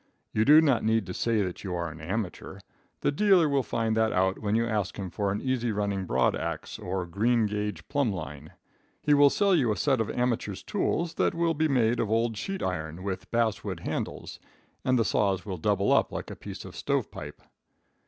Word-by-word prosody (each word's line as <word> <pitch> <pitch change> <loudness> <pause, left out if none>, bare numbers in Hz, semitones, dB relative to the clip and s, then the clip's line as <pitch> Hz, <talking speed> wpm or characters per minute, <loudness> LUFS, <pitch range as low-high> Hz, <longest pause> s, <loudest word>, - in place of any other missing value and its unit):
You 110 +1 +2
do 150 +2 +8
not 140 -8 +2
need 110 -1 +2
to 90 - -6
say 110 0 +1
that 90 -2 -5
you 95 -3 -3
are 85 -2 -3
an 80 +1 -11
amateur. 95 +4 -4 0.4
The - - +2
dealer 185 +1 +4
will 140 -2 +2
find 115 -3 -1
that 110 0 +2
out 95 +1 +1
when 105 0 0
you 115 +1 +2
ask 105 -4 -2
him 95 -3 -5
for 100 -2 -1
an 100 - -2
easy 125 -3 -1
running 100 -2 -1
broad - - +2
ax - - -4
or 95 +1 -3
a - - -9
green 110 +6 +2
gage 105 -1 -3
plumb 140 -5 +1
line. 75 -4 -7 0.5
He 150 - +4
will 145 0 +7
sell 200 +5 +2
you 130 -10 +3
a 105 - -1
set 135 +3 +2
of 110 - -2
amateur's 115 -5 -1
tools 170 -4 -1
that - - +1
will 170 0 +1
be 160 +1 +1
made 120 -4 +2
of 105 - 0
old 115 +1 +1
sheet 195 - -4
iron 80 -1 -3
with 95 -2 -4
basswood 115 -2 -1
handles, - - -4 0.4
and 130 0 +2
the 115 - +2
saws 95 -3 +1
will 95 -3 -4
double 100 +3 +1
up - - +3
like - - -5
a - - -6
piece - - -8
of - - -10
stovepipe. - - -3
110 Hz, 210 wpm, -28 LUFS, 95-130 Hz, 0.5 s, do